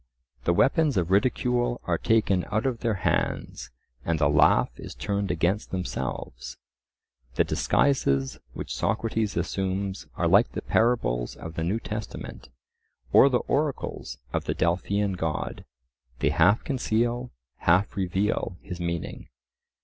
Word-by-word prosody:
The 85 Hz, -, +3 dB
weapons 145 Hz, -, +3 dB
of 90 Hz, 0 st, 0 dB
ridicule 120 Hz, +3 st, +2 dB
are 85 Hz, -2 st, 0 dB
taken 105 Hz, -5 st, +2 dB
out 110 Hz, +3 st, 0 dB
of 125 Hz, -4 st, 0 dB
their 115 Hz, -3 st, 0 dB
hands -, -, -1 dB, 0.3 s
and 85 Hz, -1 st, 0 dB
the 75 Hz, -2 st, +3 dB
laugh 75 Hz, -3 st, +4 dB
is -, -, -8 dB
turned 100 Hz, -1 st, -2 dB
against 90 Hz, +4 st, 0 dB
themselves. 65 Hz, -6 st, -4 dB, 0.8 s
The -, -, +4 dB
disguises 70 Hz, -, +1 dB
which -, -, -5 dB
Socrates 110 Hz, -1 st, -1 dB
assumes 95 Hz, +2 st, -2 dB
are -, -, +1 dB
like -, -, +4 dB
the -, -, -4 dB
parables -, -, +1 dB
of 80 Hz, -, -8 dB
the 80 Hz, -, -3 dB
New 95 Hz, +7 st, 0 dB
Testament, 105 Hz, -9 st, -7 dB, 0.6 s
or 140 Hz, -, +8 dB
the 125 Hz, -2 st, +1 dB
oracles 145 Hz, -1 st, -2 dB, 0.2 s
of -, -, -1 dB
the -, -, -1 dB
Delphian 95 Hz, +4 st, 0 dB
God; 80 Hz, -3 st, -3 dB, 0.5 s
they 70 Hz, -, +1 dB
half 90 Hz, +8 st, +4 dB
conceal, 120 Hz, -2 st, 0 dB, 0.3 s
half 90 Hz, +4 st, +2 dB
reveal, 95 Hz, 0 st, -1 dB
his 90 Hz, -1 st, -7 dB
meaning. 85 Hz, -1 st, -4 dB
100 Hz, 135 wpm, -26 LUFS, 85-115 Hz, 0.8 s, or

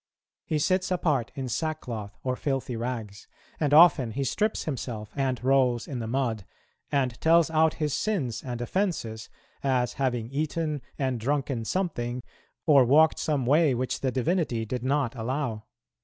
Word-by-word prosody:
He 155 Hz, -, 0 dB
sits 185 Hz, +5 st, +1 dB
apart 155 Hz, -10 st, 0 dB
in 135 Hz, -2 st, -4 dB
sackcloth 120 Hz, -6 st, -4 dB
or 130 Hz, -1 st, 0 dB
filthy 135 Hz, -3 st, -2 dB
rags; 115 Hz, -3 st, -5 dB, 0.3 s
and 150 Hz, -3 st, +1 dB
often 150 Hz, -7 st, +6 dB
he 140 Hz, -, -1 dB
strips 210 Hz, -, 0 dB
himself 115 Hz, -7 st, -5 dB
and 130 Hz, -3 st, -1 dB
rolls 130 Hz, -3 st, +2 dB
in 130 Hz, -4 st, -4 dB
the 115 Hz, -, -4 dB
mud, 115 Hz, -4 st, -1 dB, 0.5 s
and 130 Hz, -4 st, 0 dB
tells 165 Hz, 0 st, +4 dB
out 160 Hz, 0 st, +3 dB
his 150 Hz, -3 st, -1 dB
sins 150 Hz, -, -1 dB
and 125 Hz, -2 st, -5 dB
offences, 120 Hz, -, -2 dB, 0.3 s
as 130 Hz, -3 st, +1 dB
having 120 Hz, -4 st, 0 dB
eaten 150 Hz, 0 st, -2 dB, 0.2 s
and 130 Hz, -3 st, -1 dB
drunken 135 Hz, -1 st, -1 dB
something, 125 Hz, -8 st, -2 dB, 0.4 s
or 145 Hz, -5 st, +6 dB
walked 155 Hz, +6 st, +4 dB
some 145 Hz, -5 st, 0 dB
way 145 Hz, +1 st, +4 dB
which 125 Hz, +1 st, -2 dB
the 130 Hz, -, 0 dB
divinity 130 Hz, -3 st, 0 dB
did 125 Hz, +2 st, -4 dB
not 135 Hz, -2 st, +1 dB
allow. 120 Hz, -2 st, -3 dB
135 Hz, 155 wpm, -27 LUFS, 120-150 Hz, 0.5 s, often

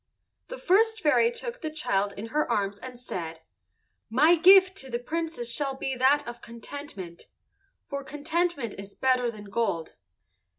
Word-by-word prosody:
The -, -, -7 dB
first 445 Hz, +4 st, +3 dB
fairy 335 Hz, +8 st, +4 dB
took 475 Hz, +1 st, -6 dB
the 315 Hz, -, -3 dB
child 205 Hz, -10 st, -1 dB
in 220 Hz, +3 st, -6 dB
her 300 Hz, -1 st, 0 dB
arms 200 Hz, -2 st, -1 dB
and 255 Hz, -1 st, -9 dB
said, 165 Hz, -9 st, -6 dB, 0.7 s
"My 295 Hz, +9 st, +5 dB
gift 375 Hz, +2 st, +7 dB
to 265 Hz, -, -6 dB
the 240 Hz, -, -1 dB
Princess 315 Hz, -2 st, -3 dB
shall 275 Hz, -1 st, -1 dB
be 265 Hz, 0 st, -3 dB
that 275 Hz, +3 st, +3 dB
of 240 Hz, 0 st, -7 dB
contentment, 230 Hz, -, -9 dB, 0.6 s
for 280 Hz, -1 st, -5 dB
contentment 295 Hz, -, -2 dB
is 200 Hz, 0 st, -10 dB
better 255 Hz, -2 st, +2 dB
than 215 Hz, -3 st, -9 dB
gold." 195 Hz, -8 st, -2 dB
265 Hz, 155 wpm, -27 LUFS, 230-325 Hz, 0.7 s, gift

